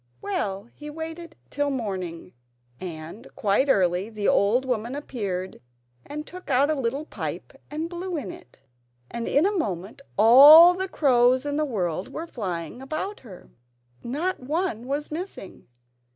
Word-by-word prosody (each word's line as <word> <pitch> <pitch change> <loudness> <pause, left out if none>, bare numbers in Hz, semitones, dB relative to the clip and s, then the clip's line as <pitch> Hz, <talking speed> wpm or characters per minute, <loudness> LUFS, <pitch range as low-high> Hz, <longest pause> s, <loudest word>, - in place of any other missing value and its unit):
Well, 200 - -3
he 300 0 -9
waited 325 +2 -7 0.2
till 290 0 0
the 275 - -2
morning, 185 -8 -5 0.5
and 170 +6 -8
quite 215 +7 +1
early 185 -2 +2
the 215 -2 -3
old 230 +6 +3
woman 245 0 -2
appeared 195 -10 -5 0.5
and 300 +1 -6
took 365 0 -11
out 275 +3 +3
a - - +2
little 270 +1 -2
pipe - - -6 0.2
and 310 +2 -3
blew 350 0 -4
in 215 -11 -5
it, 120 - -15 0.5
and 235 -1 -4
in 295 +5 +3
a 410 +1 +1
moment 200 - -3 0.2
all 290 - +10
the 380 +1 -3
crows 255 -3 +3
in 290 0 -2
the 305 - +1
world 185 - -3
were 325 - -5
flying 190 - -5
about 310 +9 -4
her. 200 -8 -14 0.5
Not 315 +10 -2
one 275 - -2
was 290 +3 -3
missing. 330 - -7
260 Hz, 150 wpm, -25 LUFS, 200-310 Hz, 0.5 s, all